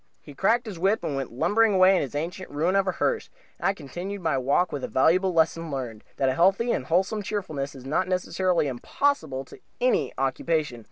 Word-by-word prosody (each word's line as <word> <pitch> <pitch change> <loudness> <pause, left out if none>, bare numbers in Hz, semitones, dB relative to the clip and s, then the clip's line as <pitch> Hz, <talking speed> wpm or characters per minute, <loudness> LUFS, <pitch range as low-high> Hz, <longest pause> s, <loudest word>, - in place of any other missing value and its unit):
He 145 - -13
cracked 230 - +2
his 200 -6 -7
whip 195 +5 +1
and 145 - -2
went 135 -2 -4
lumbering 210 - +2
away 185 +1 +6
with 185 - +2
his 140 -1 -5
ancient 175 +5 -4
ruin 165 +6 0
of 195 -1 +2
a 185 - +1
hearse, 465 -2 -1 0.3
and - - 0
I 195 - +1
continued 180 +6 -6
my 160 -4 +1
walk 140 +7 +1
with 145 - -4
a - - -1
valuable 185 +8 +3
lesson 165 0 +1
learned 125 -6 -5
that 135 - +1
a 130 - +2
healthy 195 - +3
and 130 - -2
wholesome 190 +5 +1
cheerfulness 155 -10 -4
is 130 -1 -11
not 155 +7 0
necessarily 185 -1 0
impossible 135 - -1
to - - -14 0.2
any 250 +1 +2
occupation. 135 0 -1
170 Hz, 210 wpm, -26 LUFS, 140-195 Hz, 0.3 s, away